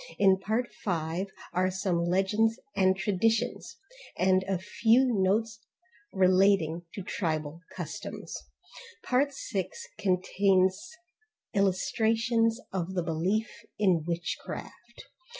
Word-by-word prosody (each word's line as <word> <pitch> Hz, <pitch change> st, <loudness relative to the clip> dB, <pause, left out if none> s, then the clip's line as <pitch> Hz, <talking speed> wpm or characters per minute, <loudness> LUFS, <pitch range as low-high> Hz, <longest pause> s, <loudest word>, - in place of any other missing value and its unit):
In 190 Hz, -1 st, +5 dB
part 220 Hz, +5 st, -1 dB, 0.2 s
5, 170 Hz, 0 st, -1 dB, 0.3 s
are 185 Hz, +1 st, +2 dB
some 185 Hz, -2 st, -1 dB
legends 210 Hz, +6 st, +2 dB, 0.2 s
and 190 Hz, -1 st, +3 dB
traditions, 210 Hz, +2 st, 0 dB, 0.4 s
and 185 Hz, 0 st, +3 dB
a 195 Hz, -1 st, 0 dB
few 225 Hz, +7 st, +3 dB
notes 220 Hz, 0 st, +1 dB, 0.5 s
relating 185 Hz, -3 st, +3 dB
to 195 Hz, -, -5 dB
tribal 160 Hz, -3 st, -3 dB
customs. -, -, -6 dB, 0.7 s
Part 275 Hz, +3 st, +2 dB
6 200 Hz, -8 st, -4 dB, 0.2 s
contains 190 Hz, -, +2 dB, 0.6 s
illustrations 225 Hz, +4 st, +1 dB
of 190 Hz, 0 st, -3 dB
the 180 Hz, -, 0 dB
belief 180 Hz, +8 st, 0 dB, 0.3 s
in 185 Hz, -6 st, +3 dB
witchcraft. 175 Hz, +7 st, -6 dB
190 Hz, 95 wpm, -29 LUFS, 180-220 Hz, 0.7 s, In